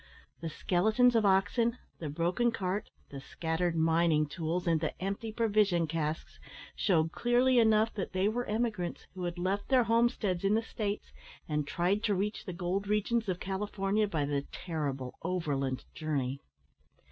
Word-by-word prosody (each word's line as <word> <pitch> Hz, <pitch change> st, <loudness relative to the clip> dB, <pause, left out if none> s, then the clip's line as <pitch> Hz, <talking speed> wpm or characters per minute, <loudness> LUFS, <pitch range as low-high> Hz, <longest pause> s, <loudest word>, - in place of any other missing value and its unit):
The 165 Hz, -, -4 dB
skeletons 220 Hz, +10 st, +3 dB
of 220 Hz, -3 st, +4 dB
oxen, 200 Hz, +5 st, +2 dB, 0.2 s
the 155 Hz, -, -4 dB
broken 175 Hz, +10 st, +1 dB
cart, 195 Hz, -1 st, -2 dB, 0.2 s
the 140 Hz, -, -6 dB
scattered 165 Hz, +3 st, -2 dB
mining 160 Hz, -1 st, +3 dB
tools, 165 Hz, +3 st, -3 dB
and 165 Hz, -3 st, +2 dB
the 155 Hz, -, -3 dB
empty 200 Hz, +4 st, -3 dB
provision 210 Hz, -6 st, +2 dB
casks, 155 Hz, 0 st, -3 dB, 0.4 s
shewed 165 Hz, -5 st, +2 dB
clearly 245 Hz, +3 st, +3 dB
enough 220 Hz, -1 st, +4 dB
that 195 Hz, -, -4 dB
they 185 Hz, +1 st, +1 dB
were 240 Hz, +3 st, -1 dB
emigrants 210 Hz, -5 st, -2 dB
who 180 Hz, -1 st, -4 dB
had 175 Hz, 0 st, -3 dB
left 190 Hz, +3 st, -1 dB
their 260 Hz, -2 st, +5 dB
homesteads 230 Hz, -5 st, +1 dB
in 200 Hz, +2 st, +3 dB
the 225 Hz, -, +1 dB
States, 210 Hz, -2 st, -4 dB, 0.3 s
and 150 Hz, -2 st, -1 dB
tried 180 Hz, +6 st, +1 dB
to 205 Hz, -, +2 dB
reach 205 Hz, +3 st, -2 dB
the 185 Hz, -, -4 dB
gold 180 Hz, +4 st, -2 dB
regions 210 Hz, +1 st, +1 dB
of 180 Hz, -1 st, -1 dB
California 195 Hz, +2 st, -1 dB
by 155 Hz, -7 st, -1 dB
the 140 Hz, -1 st, 0 dB
terrible 140 Hz, -7 st, -4 dB
overland 145 Hz, -7 st, -2 dB
journey. 140 Hz, -4 st, -2 dB
185 Hz, 160 wpm, -31 LUFS, 165-215 Hz, 0.4 s, their